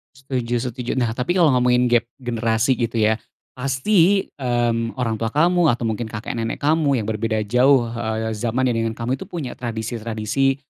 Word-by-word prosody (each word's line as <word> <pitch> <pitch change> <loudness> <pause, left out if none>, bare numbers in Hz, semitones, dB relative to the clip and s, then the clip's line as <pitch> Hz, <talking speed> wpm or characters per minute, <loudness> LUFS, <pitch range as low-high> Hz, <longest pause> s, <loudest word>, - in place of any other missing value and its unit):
Setuju 125 -3 -2
setuju. 120 +1 -4
Nah 115 -2 0
tapi 125 +6 -1
kalau 155 -6 +5
ngomongin 125 0 +3
gap 120 -1 +3 0.2
generasi 115 0 +1
gitu 115 -1 -2
ya. 110 +1 +3 0.4
Pasti, 165 +9 +2 0.2
mmm, 120 -2 0
orang 115 -4 -2
tua 115 - 0
kamu 170 +7 +3
atau 120 0 -3
mungkin 115 0 -2
kakek 110 0 -5
nenek 115 0 -2
kamu 145 -4 +2
yang - - -6
berbeda 110 0 -1
jauh, 125 +4 +4
eee, 110 -1 -2
zamannya 120 +4 0
dengan 115 -1 -1
kamu, 125 +3 -2
itu - - -8
punya 155 -8 -5
tradisi-tradisi, 115 +2 -1
120 Hz, 170 wpm, -21 LUFS, 115-130 Hz, 0.4 s, kalau